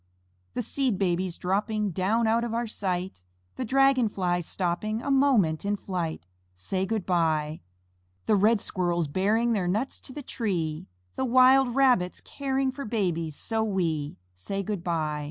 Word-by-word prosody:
The 245 - -1
Seed 255 -2 0
Babies 180 -2 0
dropping 210 +2 -1
Down 205 +7 +1
out 225 +1 +2
of 230 -1 -2
our 235 +1 0
sight, 185 - -3 0.3
The - - -3
Dragon 265 -1 +3
flies 175 -4 -1
stopping 195 +4 -1
A 280 - -2
moment 250 - +3
in 205 +1 0
flight, 175 - -4 0.3
Say, 185 - -2
"Good 215 -2 -2
by." 160 -4 0 0.6
The 215 - +3
red 210 +3 +4
Squirrels 175 -3 -1
bearing 215 +9 +1
Their 190 -5 0
nuts 215 +9 -1
to - - -8
the 290 +2 -7
tree, 170 -12 -2 0.3
The 265 - 0
wild 255 0 +5
Rabbits 250 -10 +3
caring 270 -1 -2
For 280 +2 -7
babies 175 - -1
so 225 +6 -1
wee, 165 -8 -1 0.2
Say, 195 - -4
"Good 200 -3 -4
by." 155 -3 -1
200 Hz, 155 wpm, -27 LUFS, 175-235 Hz, 0.6 s, wild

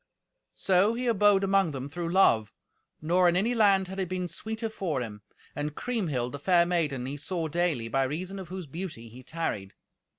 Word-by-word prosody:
So 195 +4 +3
he 250 +1 -3
abode 205 -4 +4
among 195 -4 +2
them 135 0 -5
through 170 +3 -4
love, 115 - +4 0.5
nor 175 +3 +4
in 175 - +1
any 215 +7 +2
land 200 -4 +4
had 190 +1 -6
it 185 -3 -2
been 185 -1 -2
sweeter 220 +5 -4
for 185 -10 -2
him. 105 -4 -6 0.3
And 150 0 -3
Kriemhild, 160 - -2
the 145 - -6
fair 175 +2 +4
maiden, 155 -8 -1
he 140 +2 -4
saw 165 +3 -2
daily, 160 -7 0
by 135 +3 +1
reason 185 +8 -4
of 190 - -7
whose 185 -1 -6
beauty 150 -6 -7
he 125 +3 -12
tarried. 125 -10 -4
175 Hz, 190 wpm, -28 LUFS, 140-195 Hz, 0.5 s, abode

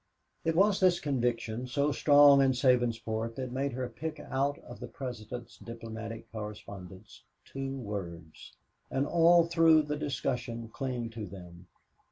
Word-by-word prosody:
It 165 0 0
was 200 +2 +4
this 180 -2 +4
conviction, 120 -3 -1
so 140 +3 +1
strong 145 -1 +6
in 135 -1 +4
Sabinsport, 115 -3 +1
that 130 -2 -5
made 135 +1 -2
her 125 0 -3
pick 155 +3 -6
out 140 +1 -1
of 120 - -10
the - - -6
President's 120 -2 -7
diplomatic 115 -1 -8
correspondence 100 -3 -9 0.2
two 135 0 -5
words, 85 -9 -7 0.4
and 135 +1 0
all 170 +1 +5
through 165 -2 +5
the 150 0 -3
discussion 125 -5 -3
cling 125 -2 -4
to 110 -2 -6
them. 90 -1 -12
125 Hz, 140 wpm, -30 LUFS, 110-145 Hz, 0.4 s, strong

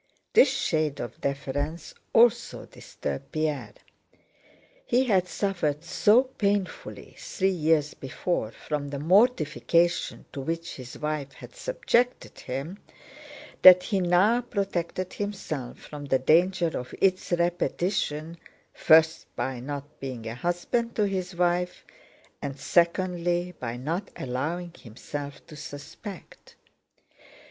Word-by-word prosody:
This 270 - +7
shade 155 - 0
of 120 - -6
deference 145 +3 -3 0.2
also 235 0 +3
disturbed - - -6
Pierre. 155 -3 -2 1.1
He 245 +2 +2
had 190 -7 +2
suffered 175 -7 -1
so 215 +8 +4
painfully 205 -7 -3
three 190 -1 0
years 155 -4 +2
before 135 -2 -2
from 145 +5 -4
the 140 - -4
mortification 170 - +2
to 140 - -4
which 165 +4 -4
his 125 -1 -9
wife 150 -2 -3
had - - -13
subjected - - 0
him 140 +10 -5 0.8
that 180 0 +10
he 200 -3 0
now 185 +7 +4
protected 185 -5 -3
himself 175 -11 -4
from 145 -1 -9
the 135 -1 +2
danger 170 +5 +3
of 125 - -5
its 185 -1 +2
repetition, 170 -2 -1 0.4
first 160 +1 +4
by 130 -2 -2
not 140 +2 -7
being 130 -4 -6
a 115 - -4
husband 175 - -1
to 215 - +2
his 185 -2 -3
wife, 180 0 0 0.6
and 140 -1 -4
secondly 175 0 +1
by 120 -1 -4
not 165 +10 -3
allowing 160 +8 -3
himself 140 +4 -8
to 155 - -12
suspect. 150 +7 -10
170 Hz, 115 wpm, -27 LUFS, 145-190 Hz, 1.1 s, that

